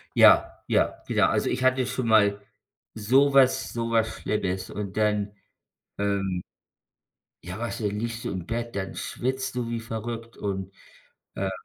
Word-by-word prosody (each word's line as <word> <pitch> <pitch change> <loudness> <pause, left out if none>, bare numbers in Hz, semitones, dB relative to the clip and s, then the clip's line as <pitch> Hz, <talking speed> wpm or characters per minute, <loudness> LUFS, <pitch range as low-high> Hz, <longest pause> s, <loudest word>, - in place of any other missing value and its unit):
Ja, - - +6
ja, - - +1
wieder. - - +3
Also, - - +1
ich 125 +1 -1
hatte 130 0 +3
schon 125 -1 -2
mal 100 -2 +4 0.5
sowas 130 +4 +4
sowas 115 -1 +1
Schlimmes 95 -3 -2
und 100 -1 -5
dann, 105 -1 +1 0.6
ähm 100 -3 -1 1.0
ja, 90 +4 -6
weißt 120 0 -4
du, 105 - +1
dann 105 +1 -3
liegst 115 0 -4
du - - -2
im 90 -3 -4
Bett, 115 0 -3
dann 95 -3 -3
schwitzt 130 +1 -3
du 120 -2 -2
wie 115 0 -2
verrückt 115 +1 -6
und, 95 -2 -3 0.6
ähm - - -1
110 Hz, 150 wpm, -26 LUFS, 100-120 Hz, 1.0 s, Ja